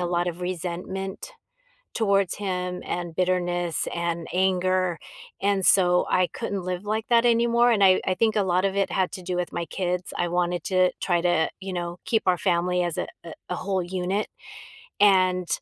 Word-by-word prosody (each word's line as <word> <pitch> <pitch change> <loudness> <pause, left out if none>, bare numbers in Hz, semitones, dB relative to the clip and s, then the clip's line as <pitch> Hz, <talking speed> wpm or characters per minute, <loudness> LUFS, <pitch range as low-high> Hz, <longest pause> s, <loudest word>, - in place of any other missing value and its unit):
a 175 - 0
lot 175 0 0
of 175 0 -6
resentment 185 - -5 0.6
towards 200 -4 +1
him 180 -2 -3
and 175 -2 -4
bitterness 175 -1 0
and 170 -1 -2
anger, 185 -1 +1 0.4
and 200 -1 +1
so, 180 -2 +4
I 185 -1 +2
couldn't 200 -5 -4
live 180 +2 -4
like 220 +1 -1
that 235 0 +5
anymore, 235 +1 +4
and 205 -4 +4
I 185 -1 +5
I 185 - +2
think 220 +2 +1
a 210 - +2
lot 185 0 +1
of 195 0 0
it 195 -1 +1
had 190 -1 0
to 185 - -7
do 180 0 -3
with 180 -1 -2
my 170 - -3
kids. 180 -1 -3
I 175 - 0
wanted 175 0 -1
to 185 -1 +3
try 175 -2 +1
to, 170 -2 +1
you 190 -1 -5
know, 175 0 -4
keep 225 - +1
our 180 -1 +3
family 180 -1 +1
as 175 -2 -2
a - - -2 0.2
a 165 - -8 0.2
a - - 0
whole 190 0 -1
unit, 185 +3 -2 0.7
and 185 -3 +4
185 Hz, 190 wpm, -25 LUFS, 175-195 Hz, 0.7 s, that